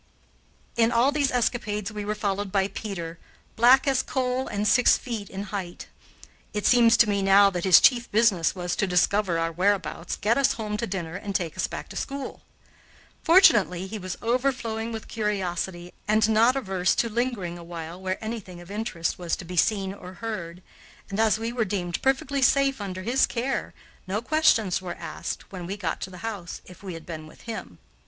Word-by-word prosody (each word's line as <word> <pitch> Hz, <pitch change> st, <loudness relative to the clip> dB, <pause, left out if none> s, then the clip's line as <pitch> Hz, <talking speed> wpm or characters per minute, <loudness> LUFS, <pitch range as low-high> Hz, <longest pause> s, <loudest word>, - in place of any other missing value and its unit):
In 230 Hz, 0 st, +4 dB
all 240 Hz, +4 st, +3 dB
these 285 Hz, -2 st, +1 dB
escapades 220 Hz, -4 st, -1 dB
we 210 Hz, -1 st, -5 dB
were 210 Hz, +1 st, -1 dB
followed 200 Hz, -1 st, -2 dB
by 195 Hz, 0 st, +1 dB
Peter, 170 Hz, -7 st, -6 dB, 0.4 s
black 250 Hz, +4 st, +6 dB
as 270 Hz, -2 st, +3 dB
coal 255 Hz, 0 st, -1 dB
and 210 Hz, 0 st, -1 dB
six 250 Hz, +4 st, +5 dB
feet 225 Hz, -5 st, -6 dB
in 195 Hz, +1 st, -5 dB
height. 180 Hz, -4 st, -5 dB, 0.6 s
It 210 Hz, -1 st, -2 dB
seems 235 Hz, -2 st, +6 dB
to 230 Hz, -, +6 dB
me 200 Hz, -1 st, +1 dB
now 195 Hz, +1 st, +6 dB
that 180 Hz, -1 st, -3 dB
his 185 Hz, -2 st, +8 dB
chief 240 Hz, -2 st, +3 dB
business 205 Hz, -6 st, +3 dB
was 175 Hz, -1 st, -2 dB
to 205 Hz, -, +1 dB
discover 180 Hz, 0 st, +2 dB
our 165 Hz, 0 st, 0 dB
whereabouts, 185 Hz, 0 st, -1 dB
get 230 Hz, +5 st, +1 dB
us 275 Hz, -, +3 dB
home 215 Hz, -2 st, -4 dB
to 235 Hz, -, -2 dB
dinner, 180 Hz, -3 st, -4 dB
and 200 Hz, +1 st, -5 dB
take 170 Hz, -4 st, -1 dB
us -, -, -1 dB
back -, -, -7 dB
to -, -, -10 dB
school. 275 Hz, -1 st, -5 dB, 0.8 s
Fortunately 210 Hz, -, +5 dB
he 210 Hz, +3 st, -6 dB
was 185 Hz, -1 st, -5 dB
overflowing 235 Hz, -2 st, -1 dB
with 225 Hz, -1 st, -6 dB
curiosity 185 Hz, -4 st, -3 dB
and 215 Hz, +1 st, +3 dB
not 225 Hz, +4 st, +4 dB
averse 190 Hz, -8 st, 0 dB
to 235 Hz, -, +1 dB
lingering 220 Hz, -7 st, -2 dB
a -, -, -10 dB
while 170 Hz, +1 st, -8 dB
where 185 Hz, 0 st, -2 dB
anything 210 Hz, -6 st, -6 dB
of 175 Hz, +2 st, -12 dB
interest 200 Hz, -7 st, -3 dB
was 175 Hz, -2 st, -1 dB
to 185 Hz, -, -9 dB
be 180 Hz, +2 st, -7 dB
seen 195 Hz, +1 st, +1 dB
or 185 Hz, -2 st, -10 dB
heard, 180 Hz, -5 st, -6 dB, 0.5 s
and, 195 Hz, -, -3 dB
as 220 Hz, -1 st, +3 dB
we 225 Hz, +1 st, -4 dB
were 240 Hz, -2 st, +1 dB
deemed 185 Hz, -4 st, -3 dB
perfectly 270 Hz, +1 st, 0 dB
safe 275 Hz, -1 st, +3 dB
under 185 Hz, -2 st, -5 dB
his 250 Hz, +6 st, +2 dB
care, 255 Hz, +3 st, -2 dB, 0.4 s
no 195 Hz, +3 st, -1 dB
questions 225 Hz, -, +2 dB
were 175 Hz, -2 st, -5 dB
asked -, -, -6 dB
when 180 Hz, -3 st, -7 dB
we 195 Hz, +3 st, -4 dB
got 180 Hz, -5 st, -3 dB
to -, -, -4 dB
the 180 Hz, +2 st, -9 dB
house, 200 Hz, -6 st, -5 dB
if 180 Hz, -, -14 dB
we 190 Hz, -4 st, -6 dB
had 165 Hz, -, -10 dB
been 155 Hz, -2 st, -7 dB
with -, -, -16 dB
him. 230 Hz, -1 st, -7 dB
205 Hz, 195 wpm, -26 LUFS, 180-230 Hz, 0.8 s, his